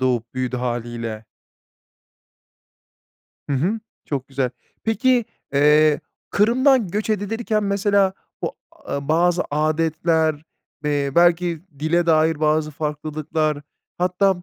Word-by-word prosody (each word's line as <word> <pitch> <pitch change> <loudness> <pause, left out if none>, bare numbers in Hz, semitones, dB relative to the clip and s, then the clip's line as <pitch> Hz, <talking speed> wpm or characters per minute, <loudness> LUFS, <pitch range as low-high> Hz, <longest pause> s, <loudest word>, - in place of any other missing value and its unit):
doğup 125 -2 0
büyüdü 130 0 -2
hâliyle. 120 -2 -4 2.2
Hı - - -1
hı. 185 +12 0 0.2
Çok 135 -2 -4
güzel. 135 -2 -1 0.3
Peki, 245 +1 +2 0.3
eee, 150 +1 +5 0.3
Kırım'dan 240 +1 +3
göç 210 +4 -2
edilirken 215 +1 -1
mesela 200 -1 +2 0.3
o, - - -2 0.2
a 140 0 -6
bazı 175 +2 +3
âdetler, 160 +1 +1 0.5
eee, 145 -2 0
belki 170 -1 +3 0.2
dile 170 +3 +1
dair 160 -1 +3
bazı 155 0 +2
farklılıklar, 155 0 -2 0.4
hatta 180 0 +1
155 Hz, 100 wpm, -22 LUFS, 145-190 Hz, 2.2 s, eee